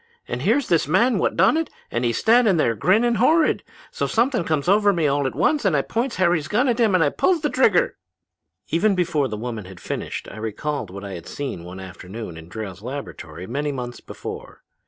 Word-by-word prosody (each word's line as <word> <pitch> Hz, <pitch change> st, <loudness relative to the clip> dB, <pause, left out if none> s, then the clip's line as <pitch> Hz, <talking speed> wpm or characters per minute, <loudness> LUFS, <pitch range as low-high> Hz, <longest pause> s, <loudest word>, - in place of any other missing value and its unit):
And -, -, -4 dB
here's 285 Hz, -4 st, +2 dB
this 165 Hz, -5 st, +2 dB
man 230 Hz, -, +3 dB
what -, -, 0 dB
done 190 Hz, -, +4 dB
it, 325 Hz, -1 st, -1 dB, 0.2 s
just 120 Hz, -, -1 dB
a 120 Hz, -, +2 dB
standin' 220 Hz, -, +4 dB
there, 120 Hz, -7 st, +2 dB
grinnin' 220 Hz, -, +2 dB
horrid. 310 Hz, +8 st, +3 dB, 0.3 s
So -, -, -2 dB
something 235 Hz, -2 st, +1 dB
comes 155 Hz, -3 st, -1 dB
over 205 Hz, +2 st, +5 dB
me 170 Hz, -5 st, 0 dB
all 140 Hz, -1 st, +2 dB
at 125 Hz, -, -5 dB
once 290 Hz, -, +2 dB
and 185 Hz, -7 st, +3 dB
I 140 Hz, -, +1 dB
points 235 Hz, +2 st, -2 dB
Harry's 175 Hz, -4 st, +2 dB
gun 245 Hz, +6 st, +2 dB
at 240 Hz, -1 st, +1 dB
him 220 Hz, -5 st, +4 dB
and 160 Hz, -5 st, +2 dB
pulls 355 Hz, -4 st, +2 dB
the 295 Hz, -, 0 dB
trigger!' 220 Hz, -8 st, +3 dB, 0.7 s
"Even 195 Hz, +5 st, +2 dB
before 165 Hz, -6 st, +1 dB
the 105 Hz, -3 st, -5 dB
woman 115 Hz, -2 st, -5 dB
had 95 Hz, -1 st, -11 dB
finished -, -, -5 dB
I -, -, -10 dB
recalled 110 Hz, +3 st, -3 dB
what 100 Hz, +2 st, -8 dB
I 95 Hz, -4 st, -6 dB
seen 135 Hz, -9 st, -6 dB
one 90 Hz, +2 st, -8 dB
afternoon 95 Hz, +1 st, -8 dB
in 80 Hz, +1 st, -11 dB
Drayle's 100 Hz, -3 st, -7 dB
laboratory 105 Hz, -, -7 dB
many 145 Hz, +8 st, -2 dB
months 125 Hz, -3 st, -5 dB
before. -, -, -9 dB
150 Hz, 205 wpm, -22 LUFS, -, 0.7 s, over